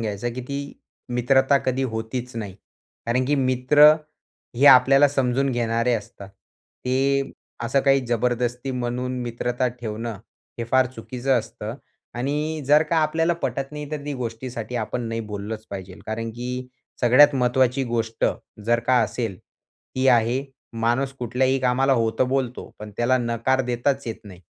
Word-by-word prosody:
घ्यायचं, 110 +2 -3
की 130 - -4
ती 140 +2 -5 0.4
मित्रता 135 +3 +3
कधी 130 0 -1
होतीच 120 +2 -4
नाही. 100 -4 -5 0.5
कारण 125 +2 +1
की 145 - +2
मित्र 135 +3 +5 0.6
हे 140 +3 +4
आपल्याला 135 +2 +7
समजून 135 0 +1
घेणारे 115 0 0
असतात. 105 -2 -7 0.6
ते 135 +2 +1 0.3
असं 120 +4 +1
काही 135 -1 +4
जबरदस्ती 120 +2 -1
म्हणून 125 0 -3
मित्रता 120 +1 -1
ठेवणं 115 -3 -6 0.4
हे 115 - -2
फार 130 +2 +3
चुकीचं 125 +3 -1
असतं 110 0 -6 0.4
आणि 150 +4 -2
जर 150 +2 +6
का 160 +1 -1
आपल्याला 165 +2 +2
पटत 135 +1 -2
नाही 150 -1 -7
तर 150 -2 -5
ती 145 - -3
गोष्टीसाठी 120 -1 -5
आपण 120 +2 -3
नाही 115 0 -3
बोललंच 105 +1 -6
पाहिजे. 95 -2 -7
कारण 115 +1 -3
की 125 +2 -5 0.3
सगळ्यात 135 +4 +6
महत्वाची 130 +1 +2
गोष्ट 115 -1 -2 0.4
जर 115 +1 +2
का 130 -1 +4
असेल, 110 -3 -3 0.6
ही 130 +1 +1
आहे 120 +3 +3 0.3
माणूस 120 +4 +1
कुठल्याही 130 +2 +1
कामाला 130 +2 +2
हो 115 -3 +2
तर 130 - +4
बोलतो 130 -1 -2
पण 105 0 -8
त्याला 120 +2 +2
नकार 120 +2 0
देताच 125 +2 -1
येत 115 - -3
नाही. 95 -3 -12
125 Hz, 150 wpm, -23 LUFS, 115-135 Hz, 0.6 s, आपल्याला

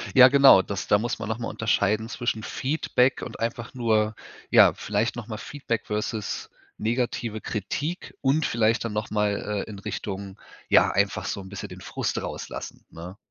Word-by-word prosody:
Ja, 130 0 +10
genau, 140 -7 +8
das 100 +1 -5
da 100 - +5
muss 115 0 -2
man - - -4
noch 110 - -1
mal 115 - -3
unterscheiden 110 0 +1
zwischen 120 -4 -2
Feedback 130 -2 0
und - - -7
einfach 115 +1 -3
nur 110 -3 +1 0.3
ja, - - +7
vielleicht 105 +4 -1
noch 120 -3 -7
mal 110 -2 -5
Feedback 120 -5 -4
versus 105 0 -3 0.3
negative 115 -1 -2
Kritik 145 - -4
und 140 +3 +2
vielleicht 115 0 +1
dann 115 - -3
nochmal, 105 -1 -1
äh, - - -13
in 100 -2 -8
Richtung, 100 0 -5 0.3
ja, - - +5
einfach - - 0
so 100 - -3
'n 95 - -11
bisschen 100 - -7
den - - -10
Frust - - -3
rauslassen, - - -7
ne? 90 +3 -9
110 Hz, 170 wpm, -25 LUFS, 105-120 Hz, 0.3 s, Ja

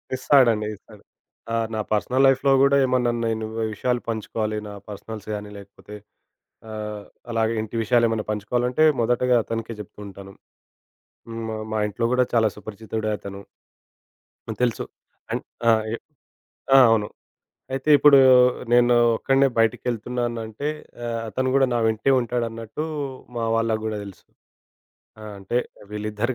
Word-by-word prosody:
ఇస్తాడండి, 120 -5 +3
ఇస్తాడు. 105 +1 -18 0.5
ఆహ్, 115 -1 0
నా 110 - -2
పర్సనల్ 125 +5 +2
లైఫ్‌లో 135 +1 +3
గూడా 140 0 +5
ఏమన్నా 125 -2 +1 0.2
నేను 110 -1 -2 0.3
విషయాలు 120 +3 -1
పంచుకోవాలి, 110 -1 -3
నా 105 - -8 0.2
పర్సనల్స్ 105 +1 -8
గానీ, 105 0 -7
లేకపోతే 100 +1 -13 0.8
ఆహ్, 105 -1 -6 0.3
అలాగే 115 -1 +1
ఇంటి 110 +2 -7
విషయాలేమన్నా 115 -1 +2
పంచుకోవాలంటే, 125 +7 0 0.2
మొదటగా 125 +2 +2
అతనికే 115 +2 -4
జెప్పుకుంటాను. 100 -1 -10 1.0
హ్మ్. 115 0 -6
మ 110 - -4
మా 110 - 0
ఇంట్లో 115 +3 -2
గూడా 125 0 +3
చాలా 110 -2 +4
సుపరిచితుడే 110 +1 -5
అతను. 100 0 -8 1.1
హ్మ్. - - -5
తెలుసు. 120 -2 0 0.5
అన్ - - -1 0.3
ఆ! - - +7 0.2
ఎ - - 0 0.8
ఆ! - - +9
అవును. 110 -2 +2 0.7
అయితే 135 +2 -4
ఇప్పుడూ 145 -1 +7 0.5
నేనూ 120 0 +5 0.2
ఒక్కడినే 135 +3 +3
బయటికెళ్తున్నానంటే, 120 +2 -1 0.4
ఆహ్, 115 -1 -2
అతను 130 +5 -1
గూడా 135 -1 +4
నా - - +2
వెంటే 110 +4 +1
ఉంటాడన్నట్టూ, 115 +2 -3 0.5
మా 115 - -1
వాళ్ళకు 115 -1 0
గూడా 110 -1 -3
దెలుసు. 100 -2 -12 1.0
ఆ! 110 - -9
అంటే, 100 +5 -1 0.3
వీళ్ళిద్దరు 105 +3 -3
115 Hz, 130 wpm, -23 LUFS, 105-125 Hz, 1.1 s, ఆ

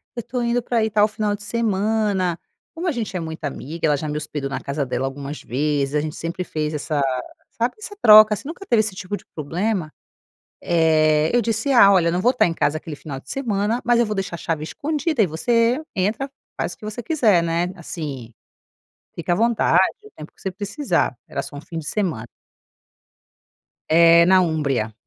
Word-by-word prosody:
eu - - -4
estou 240 +2 -4
indo 235 +1 +1
para 240 - -1
aí 220 0 +1
tal 210 0 +4
final 210 -1 -2
de 205 - -12
semana". 205 -4 0 0.3
Como 335 +3 -4
a 345 - +2
gente 230 -7 -4
é - - -1
muito 160 -1 -7
amiga 155 +3 -4
ela 150 - +3
já 150 +1 -4
me 150 - -2
hospedou 145 -2 -4
na - - -3
casa 140 +1 -3
dela 125 +1 -2
algumas 140 +2 -6
vezes. 145 +1 -1
A 150 - +2
gente 155 0 -5
sempre 170 +2 -4
fez 155 -3 -3
essa 150 0 -2 0.5
sabe, 235 +2 -1
essa 415 -1 -8
troca 215 0 +9
assim, 210 - -6
nunca 345 +5 -8
teve 235 - +3
esse 215 -3 0
tipo 185 +2 -4
de - - -12
problema. 170 +2 -2 0.7
Eh, 155 -2 +3
eu 245 - +5
disse: 225 +4 -1
"Ah, 200 -6 +7
olha, 175 -3 +4
eu - - 0
não 180 - 0
vou 245 +5 +3
estar 250 - +3
em 165 - -2
casa 155 -1 0
aquele 155 -2 -8
final 140 -3 -7
de - - -16
semana, 225 -3 -1
mas 240 0 +3
eu 235 - +3
vou 210 - -2
deixar 190 -3 -3
a - - -5
chave 160 -2 -3
escondida 305 - -1
e - - +3
você 230 - +1
entra, 215 +8 -1 0.3
faz - - -1
o - - -13
que 215 - -13
você 215 +2 -5
quiser", 220 - +3
né. 170 +2 -1
Assim, 145 -8 -7 0.8
fica 175 -2 -2
à - - +2
vontade, 230 +2 +3 0.2
o 425 - -14
tempo 155 - -10
que - - -21
você 190 - -2
precisar. 205 - -1
Era - - -4
só 145 - -9
um - - -6
fim 165 - -7
de 155 - -7
semana. 165 - -2 1.6
Eh, 170 +1 +7
na 190 0 +6
Úmbria. 140 -10 -1
185 Hz, 210 wpm, -22 LUFS, 155-225 Hz, 1.6 s, troca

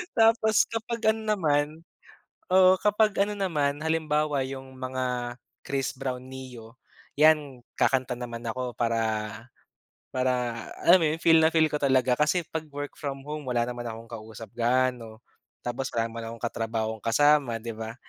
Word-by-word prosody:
Tapos 225 -1 +4
kapag 230 -1 0
ano 220 0 -5
naman. 145 -6 +2 0.9
Oo, 185 0 +7
kapag 210 +2 +3
ano 210 +1 -4
naman, 150 -8 0
halimbawa 155 -3 0
yung 130 0 -8
mga 125 -1 -3 0.3
Chris 135 -2 -2
Brown, 125 -1 -4
Ne-yo 130 -3 -10 0.4
'yan 145 -4 +3
kakanta 130 -2 +1
naman 120 -1 -6
ako 125 +1 -4
para, 115 -1 +1 1.1
para 130 0 0 0.5
alam 175 +2 +7
mo 175 - +1
yun 160 - -4
feel 165 0 +6
na 160 - +4
feel 160 -1 +4
ko 150 - -2
talaga 130 -3 +2
kasi 150 +5 +2
pag 160 -1 -4
work 145 0 -6
from 140 -2 -5
home 150 +2 -6
wala 120 -2 0
naman 120 -1 -5
akong 115 0 -7
kausap 110 -1 -9
gaano, 120 -2 0 0.4
tapos 125 +2 -4
wala 115 0 0
naman 115 0 -7
akong 115 - -11
katrabahong 110 -2 -3
kasama 135 -1 +3
'di 115 -1 -6
ba. 110 +1 -6
130 Hz, 155 wpm, -27 LUFS, 120-155 Hz, 1.1 s, Oo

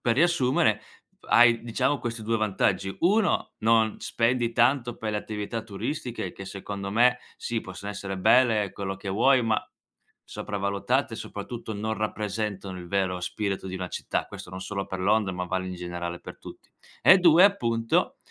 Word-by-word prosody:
per 115 -1 +1
riassumere, 155 -5 +3 0.5
hai 120 -1 +6
diciamo 130 +4 0
questi 115 -1 -4
2 115 +1 +1
vantaggi. 95 -2 0
1: 205 +5 +2
non 110 0 +2
spendi 120 0 +1
tanto 120 0 +2
per 110 -1 -3
le - - 0
attività 105 +2 -4
turistiche, 120 +4 -4
che 95 - -9
secondo 100 0 -6
me, 125 +4 +4 0.2
sì, 115 -1 -3
possono 95 +2 -7
essere 95 -1 -5
belle, 110 -1 +4
quello 95 -1 -4
che 95 +1 -8
vuoi, 125 +6 +4
ma 110 -1 +1 0.6
sopravvalutate, 100 0 -2
soprattutto 115 -2 -6
non 110 +2 -2
rappresentano 105 -3 -3
il 90 -1 -9
vero 95 -2 0
spirito 95 +1 -3
di 95 - -5
una 90 -1 -4
città. - - -3
Questo - - -10
non 95 +1 -7
solo 100 +1 -4
per 95 - -5
Londra, 100 0 +2
ma 90 0 -3
vale 95 +1 -2
in 90 - -5
generale 85 -1 -5
per - - -10
tutti. - - -12 0.3
E 190 - +8
2: 175 0 +7
appunto 115 - +1
110 Hz, 165 wpm, -26 LUFS, 95-120 Hz, 0.6 s, E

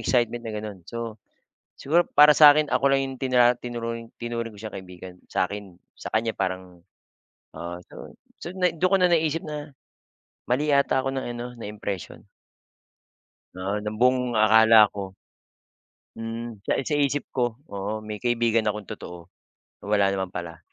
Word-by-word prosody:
excitement 120 -1 +1
na 115 -2 -6
ganun. 105 -3 -7
So, 115 -2 -6 0.6
siguro 170 +5 +3
para 150 +1 +6
sa 150 -2 +10
akin 150 0 +1
ako - - 0
lang 135 - +3
'yong 135 - -7
tinra 125 -2 +3
tinuring 115 -1 -6
tinuring 115 -1 -4
ko 105 - -14
siyang 110 0 -7
kaibigan 90 -1 -10
sa'kin 95 -1 -3 0.2
sa - - -8
kanya 110 +1 0
parang, 90 -2 -4 0.7
ah, 85 +1 -6
so - - -11 0.3
so 175 - -6
nai 180 -2 0
dun 185 +4 +1
ko - - +7
na 180 - +5
naiisip 165 -2 +1
na, 150 -1 -7 0.8
mali 145 +5 +1
yata 140 -1 +3
ako 135 - -1
ng 135 -1 -3
ano 120 +1 -5
ng 115 -4 -8
impression. 100 -3 -6 1.3
Oo, 100 +3 -2
ng 105 +1 -5
buong 125 0 +2
akala 110 0 +6
ko 95 -2 -7 1.0
mm, 115 -1 -6
sa - - +2
i 135 - -2 0.2
isip 145 +1 -3
ko 120 -3 -1 0.2
oo, 105 +2 -4
may 105 -1 -6
kaibigan 120 -2 +2
akong 105 0 -3
totoo, 90 -1 -9 0.6
wala 100 -1 +3
naman 95 -1 -3
pala. 85 -2 -6
115 Hz, 160 wpm, -25 LUFS, 100-130 Hz, 1.3 s, sa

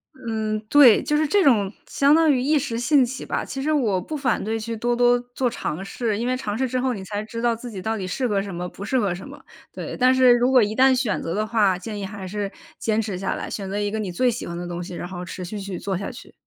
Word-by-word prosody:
嗯， 220 -4 -2
对， 275 -7 +7
就 295 - 0
是 310 -1 +2
这 400 +5 +3
种 210 -8 +3
相 280 +1 +3
当 320 -1 +5
于 260 - +2
一 295 +4 +2
时 245 -4 -3
兴 265 +3 +4
起 250 +2 -4
吧， - - -2
其 270 -1 -5
实 310 - +1
我 215 -10 +1
不 305 - -6
反 265 -5 0
对 225 +2 -2
去 225 0 -4
多 240 +2 0
多 245 0 +4
做 255 -2 +1
尝 190 -6 -4
试。 220 +1 -2
因 240 - -1
为 255 0 0
尝 210 -5 -3
试 260 +2 0
之 255 +1 -1
后 255 -1 0
你 195 -3 -6
才 205 +2 -4
知 230 +1 -6
道 235 -1 +2
自 235 +1 -8
己 190 -3 -6
到 220 +2 -2
底 190 - -4
适 250 +7 -1
合 205 -3 +1
什 195 -2 -6
么 180 +1 -4
不 200 - -8
适 260 +3 +1
合 195 -5 0
什 190 - -9
么， - - -12 0.3
对。 - - -6
但 255 +1 +5
是 255 -1 +6
如 245 +2 +2
果 255 -2 +6
一 210 +1 0
旦 260 +1 +5
选 245 -4 0
择 165 - -3
的 215 +2 -1
话， 205 -5 +2
建 210 +2 -6
议 195 - -4
还 190 -1 -7
是 205 +1 -3 0.3
坚 220 0 0
持 200 -4 -4
下 195 - -2
来， - - -5
选 195 -2 -5
择 200 +2 -3
一 205 0 0
个 220 - -3
你 205 -4 -3
最 250 +8 +2
喜 235 - -3
欢 170 - -6
的 175 0 -5
东 175 0 -4
西， 180 - -8
然 175 - -5
后 180 -1 -6
持 180 0 -7
续 205 +4 -5
去 195 -2 -5
做 195 -2 -2
下 200 - -5
去。 - - -13
220 Hz, 315 characters per minute, -23 LUFS, 195-255 Hz, 0.3 s, 对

